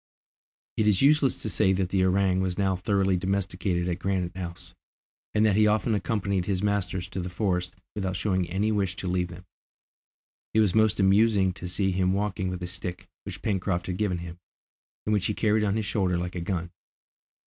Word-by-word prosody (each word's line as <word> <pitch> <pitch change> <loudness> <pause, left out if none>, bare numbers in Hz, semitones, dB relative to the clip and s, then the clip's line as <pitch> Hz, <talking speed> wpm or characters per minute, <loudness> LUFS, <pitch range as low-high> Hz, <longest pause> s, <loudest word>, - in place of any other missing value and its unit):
It 110 - +2
is 105 0 +3
useless 145 -2 +3
to 110 - -2
say 95 -1 +3
that 95 -1 0
the 95 -1 +2
orang 95 0 +2
was 95 -1 -2
now 95 -2 +1
thoroughly 95 0 +1
domesticated 90 -1 -1
at 90 0 -2
Granite 90 -2 -1
House, 85 -2 -7 0.6
and 105 +1 +4
that 105 -3 +3
he 105 0 +5
often 110 +2 +2
accompanied 100 -2 -1
his 95 -1 0
masters 95 -3 -1
to 95 - -5
the 90 - -4
forest 90 -2 -1 0.2
without 95 -3 -2
showing 95 -3 0
any 100 +4 0
wish 100 -3 0
to 95 - -5
leave 90 0 0
them. 85 +1 -11 1.1
It - - +5
was 105 -4 +3
most 110 -1 +3
amusing 100 -1 +4
to 90 - -7
see 95 +2 0
him 95 0 +1
walking 95 -2 -1
with 90 0 -5
a - - -3
stick 90 0 -5 0.2
which - - -8
Pencroft 90 -3 -1
had 90 -1 -3
given 100 -4 0
him, 85 0 -8 0.7
and 105 - +1
which 100 -3 +1
he 105 - -2
carried 110 -1 +2
on 100 -1 +1
his 110 -1 -1
shoulder 95 -5 0
like 90 +1 -3
a 90 - -4
gun. 85 -1 -3
95 Hz, 200 wpm, -27 LUFS, 90-105 Hz, 1.1 s, he